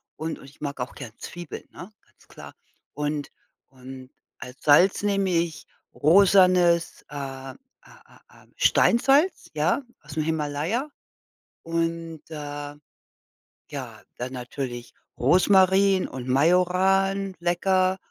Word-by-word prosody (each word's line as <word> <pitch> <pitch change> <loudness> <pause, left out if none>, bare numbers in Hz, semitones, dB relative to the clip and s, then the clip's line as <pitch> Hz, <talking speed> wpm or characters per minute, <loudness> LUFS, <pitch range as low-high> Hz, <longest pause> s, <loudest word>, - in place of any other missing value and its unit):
und 160 +1 -5
und - - -14
ich 140 +2 -18
mag 140 -2 -5
auch 125 - -4
gern 115 - -8
Zwiebeln, 175 -2 -8
ne, 185 - -11
ganz - - -28
klar. - - -12 0.4
Und 150 -1 -3 0.4
und 130 0 -12 0.3
als 125 +1 -11
Salz 175 +8 +5
nehme 195 -2 +1
ich 170 -2 -1 0.3
rosanes, 180 0 +4
äh 135 -2 -7
äh - - -8 0.3
äh - - -21
äh, - - -26
Steinsalz, 275 +9 +3
ja, 155 - 0 0.2
ausm 150 +1 -4
Himalaya. 160 - -2 0.8
Und, 165 -1 -3
äh, 145 -1 -6 1.0
ja, - - -7 0.2
dann 125 +2 -5
natürlich 125 -1 -6 0.2
Rosmarin 190 +5 +4
und 130 0 -8
Majoran, 185 +6 +2
lecker. 185 +2 +1
165 Hz, 115 wpm, -25 LUFS, 145-185 Hz, 1.0 s, Salz